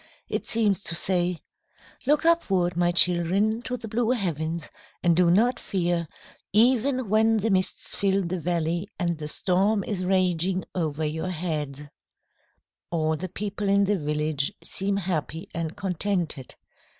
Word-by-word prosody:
It - - -3
seems 210 -4 +2
to 170 - 0
say, 175 -1 +1 0.7
"Look 295 +2 +3
upward, 190 - +2
my 175 0 +2
children, 180 +6 +3
to 250 0 -4
the 225 -1 -8
blue 230 +2 0
heavens, 170 - -2 0.3
and 170 -2 +4
do 175 0 +4
not 230 +8 +3
fear, 175 -3 -1 0.4
even 250 +3 +3
when 220 +2 +3
the 220 +1 0
mists 185 -1 -1
fill 195 -1 +1
the 180 +1 -3
valley 170 +2 -1
and 170 -3 -1
the 150 - -4
storm 195 +6 +1
is 185 -2 -3
raging 185 -1 +1
over 155 -3 -1
your 160 +4 -2
heads." 155 -5 -3 1.1
All 160 -2 0
the 185 +4 -5
people 205 +2 -3
in 200 0 +4
the 200 -1 +1
village 150 -1 -1
seem 195 +1 -2
happy 170 -1 -3
and 165 -1 -4
contented. 180 -7 -2
180 Hz, 145 wpm, -26 LUFS, 165-205 Hz, 1.1 s, and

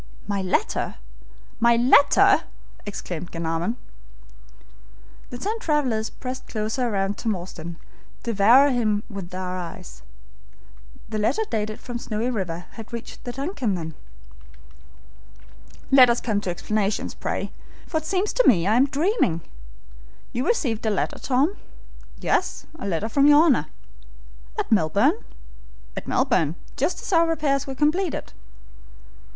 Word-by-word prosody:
"My 200 -1 -1
letter! 190 - -1 0.6
my 235 0 +5
letter!" 250 +4 +5 0.4
exclaimed 175 -4 -5
Glenarvan. 165 +6 -2 1.5
The 245 - -6
ten 425 - -3
travelers 260 - 0
pressed 255 0 -7
closer 220 +3 -1
round 195 -1 -1
Tom 220 -3 0
Austin, 170 -2 -8 0.5
devouring 235 +6 +5
him 215 -4 +1
with 195 -4 -6
their 185 0 -4
eyes. 180 +1 -8 1.1
The 215 -1 -2
letter 310 - +1
dated 215 -1 -2
from 245 -1 -6
Snowy 230 +2 -2
River 180 -6 -3
had 225 -1 -10
reached 235 -1 -8
the 245 - -3
DUNCAN, 270 - -2
then. 160 -2 -5 2.0
"Let 260 -2 +8
us 235 - +2
come 210 -3 -1
to 190 - -3
explanations, 205 +3 -1
pray, - - -3 0.3
for 320 - -2
it 315 - -3
seems 390 +4 0
to - - +3
me 175 -8 +5
I 215 +4 +3
am 265 +3 +5
dreaming. 285 - +1 0.9
You 250 +3 -1
received 245 - 0
a - - +4
letter, 205 - -1
Tom?" 280 +9 +1 0.6
"Yes, - - 0
a - - -4
letter 190 +3 -1
from 275 +5 +3
your 295 +1 +8
Honor." 245 - +3 0.9
"At - - -2
Melbourne?" 215 - +3 0.7
"At - - -6
Melbourne, 185 - +2 0.2
just 330 +7 0
as - - -3
our 335 0 +5
repairs 285 -3 0
were 270 - -5
completed." 305 +4 0
230 Hz, 135 wpm, -24 LUFS, 195-280 Hz, 2.0 s, Let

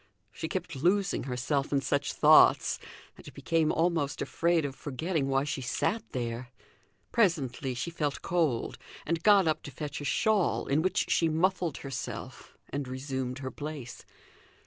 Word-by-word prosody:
She 160 - -5
kept 185 -4 -4
losing 180 +1 +1
herself 135 +2 -1
in 140 - +3
such 145 +1 0
thoughts, - - +6 0.4
and - - -12
became 165 -2 +1
almost 165 -4 0
afraid 170 -2 +1
of 140 - -3
forgetting 150 +2 -2
why 135 0 +2
she 145 -1 -3
sat 130 - 0
there. 120 0 -4 0.6
Presently 140 - +1
she 170 +8 -3
felt 150 -4 -2
cold, 160 -9 0 0.3
and 165 +1 -1
got 200 -2 +5
up 155 0 +1
to - - -8
fetch 145 +2 -6
a - - -5
shawl, 210 - +2
in 140 +3 +2
which 185 +3 0
she 165 - +3
muffled 175 +1 +1
herself 135 -2 -6
and 140 -1 -3
resumed 130 -1 -4
her 130 - -3
place. 145 -5 -7
145 Hz, 150 wpm, -29 LUFS, 130-170 Hz, 0.6 s, thoughts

